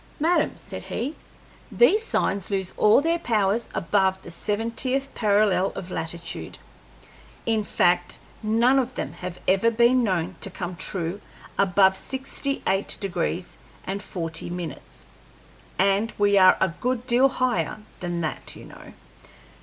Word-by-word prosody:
"Madam," 335 +4 +2
said - - -7
he, 280 +7 -4 0.6
"these 440 -2 +4
signs 200 - 0
lose 190 -2 -1
all 210 +6 +5
their 335 +2 +1
powers 220 - +1
above 190 +1 +1
the 170 - -8
seventieth 230 +8 -2
parallel 205 -3 +3
of 185 -1 -7
latitude. 165 +1 -5 0.9
In 220 -2 +1
fact, 175 -2 +2 0.2
none 235 +5 +3
of 255 0 -2
them - - -4
have 180 -1 -7
ever 195 +5 +4
been 240 +2 +4
known 185 -4 -1
to - - -2
come 180 -1 -5
true 175 +2 -3 0.3
above 190 0 +4
sixty 270 +4 -4
eight 195 +1 0
degrees 180 -2 -3 0.3
and 195 +1 -3
forty 165 -5 -5
minutes, 170 - -7 0.7
and 200 +4 +2
we 205 0 +3
are 185 -1 +7
a 190 - +3
good 250 -1 -1
deal 255 +2 +4
higher 255 -4 0 0.2
than 175 -1 -3
that, 155 - -4
you - - -11
know." - - -13
200 Hz, 140 wpm, -25 LUFS, 180-240 Hz, 0.9 s, are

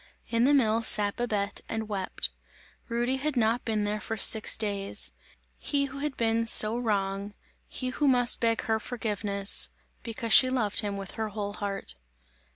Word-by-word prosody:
In 230 +1 +2
the 285 - +4
mill 225 -4 +2
sat 205 -2 +1
Babette 210 -4 -2
and 220 -1 -4
wept; 195 -3 -3 0.6
Rudy 240 +3 -1
had 285 0 -3
not 230 +1 +1
been 215 -2 -1
there 210 +1 -2
for 225 - -5
six 215 +1 +6
days; 195 - -4 0.5
he 280 -1 -1
who 275 0 -8
had 290 -1 -4
been 230 0 0
so 215 0 +7
wrong; 200 -3 -2 0.3
he 255 - -4
who 285 +3 -1
must 245 -2 +3
beg 230 -1 0
her 220 -1 0
forgiveness, 205 -4 -1 0.3
because 230 -1 -3
she 255 - +7
loved 230 -6 -1
him 205 -2 -3
with 195 -2 -7
her 220 -1 -4
whole 205 -1 -5
heart. 200 -1 -5
220 Hz, 165 wpm, -27 LUFS, 205-240 Hz, 0.6 s, so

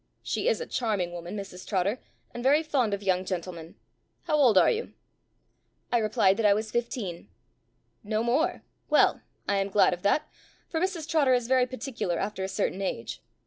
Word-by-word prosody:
She - - -1
is - - +2
a 480 - -4
charming 210 - -1
woman, 175 +3 -6
Mrs 190 -2 -8
Trotter, 200 +4 0 0.3
and 240 - -6
very 285 +5 +4
fond 270 -8 +1
of 200 - -10
young 185 -1 +1
gentlemen. 175 -3 -5 0.5
How 305 - 0
old 255 -9 +5
are - - +6
you?" 455 +1 -3 1.0
I 240 - +3
replied 215 -3 +3
that 225 - 0
I 200 - +5
was 215 +1 -3
fifteen. 230 -7 -3 0.7
"No 215 +1 -1
more! 250 +7 +1 0.3
well, - - +4 0.3
I 200 - +2
am 195 0 0
glad 200 -1 +4
of 180 - -6
that, 205 +11 +2 0.4
for 320 - -2
Mrs 350 -3 -2
Trotter 290 -6 +3
is 245 -2 -1
very 255 -1 +3
particular 255 -9 -3
after 195 0 -3
a - - -1
certain 190 0 -2
age. 120 -11 -4
215 Hz, 185 wpm, -27 LUFS, 190-260 Hz, 1.0 s, are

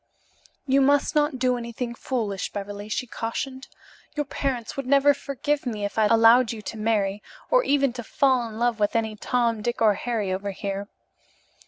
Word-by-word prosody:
"You 275 0 +3
must 285 +1 +3
not 295 -3 +2
do 250 -1 +1
anything 235 0 -5
foolish, 225 -6 -3
Beverly," 205 +1 -6
she 250 - -2
cautioned, 260 +3 -5 0.5
"Your 295 -1 -1
parents 260 -5 -3
would 275 -2 -4
never 280 +1 +5
forgive 280 0 -2
me 210 -4 -2
if 205 - -3
I 215 - +5
allowed 230 +2 +5
you 225 - -6
to - - -6
marry 210 -2 0 0.3
or - - +5
even 275 - +2
to 240 -1 -6
fall 255 -1 +1
in 215 - -9
love 235 -1 0
with 205 +1 +1
any 220 -1 0
Tom, 230 0 0
Dick 240 +3 -2
or 220 -2 +5
Harry 210 -3 -2
over 200 +2 -3
here. 200 0 -4
235 Hz, 180 wpm, -25 LUFS, 215-265 Hz, 0.5 s, never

